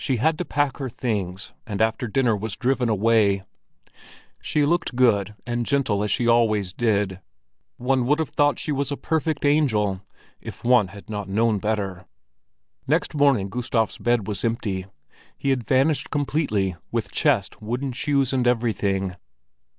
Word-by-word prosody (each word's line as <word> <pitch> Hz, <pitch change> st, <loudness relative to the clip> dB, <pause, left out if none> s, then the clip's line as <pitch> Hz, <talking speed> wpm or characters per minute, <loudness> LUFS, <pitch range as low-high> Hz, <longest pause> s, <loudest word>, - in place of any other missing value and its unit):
She 130 Hz, -3 st, +1 dB
had 155 Hz, +7 st, +1 dB
to 180 Hz, -, -2 dB
pack 145 Hz, -3 st, 0 dB
her 135 Hz, -2 st, -4 dB
things, 100 Hz, -6 st, -3 dB
and 100 Hz, -2 st, -4 dB
after 110 Hz, +2 st, +1 dB
dinner 120 Hz, 0 st, +2 dB
was 105 Hz, +1 st, -4 dB
driven 125 Hz, -2 st, 0 dB
away. 105 Hz, -2 st, +3 dB, 1.0 s
She 150 Hz, -1 st, +1 dB
looked 165 Hz, -4 st, 0 dB
good 105 Hz, -5 st, +2 dB
and 120 Hz, 0 st, -1 dB
gentle 130 Hz, -6 st, +1 dB
as 105 Hz, -, -1 dB
she 120 Hz, +1 st, +1 dB
always 110 Hz, -6 st, +2 dB
did; 100 Hz, -4 st, 0 dB, 0.6 s
one 125 Hz, 0 st, +1 dB
would 150 Hz, +2 st, +3 dB
have 160 Hz, -3 st, -2 dB
thought 145 Hz, 0 st, +2 dB
she 155 Hz, -, -3 dB
was 140 Hz, 0 st, -1 dB
a 140 Hz, -, -2 dB
perfect 160 Hz, -2 st, -1 dB
angel—if 105 Hz, -10 st, -1 dB
one 120 Hz, -4 st, +4 dB
had 100 Hz, +2 st, -13 dB
not 105 Hz, -2 st, -5 dB
known 110 Hz, +1 st, +2 dB
better. 100 Hz, -4 st, -3 dB, 0.8 s
Next -, -, +1 dB
morning 140 Hz, -9 st, +3 dB
Gustav's 115 Hz, 0 st, -1 dB
bed 120 Hz, -4 st, +1 dB
was 100 Hz, -3 st, -4 dB
empty. 105 Hz, -5 st, -2 dB, 0.5 s
He 140 Hz, -, 0 dB
had 125 Hz, -5 st, -1 dB
vanished 135 Hz, +3 st, +2 dB
completely, 135 Hz, -, 0 dB, 0.2 s
with 115 Hz, -2 st, -2 dB
chest, 130 Hz, -12 st, +1 dB
wooden 125 Hz, +5 st, -3 dB
shoes 135 Hz, +1 st, 0 dB
and 125 Hz, -2 st, +1 dB
everything. 100 Hz, -6 st, 0 dB
115 Hz, 155 wpm, -24 LUFS, 105-135 Hz, 1.0 s, one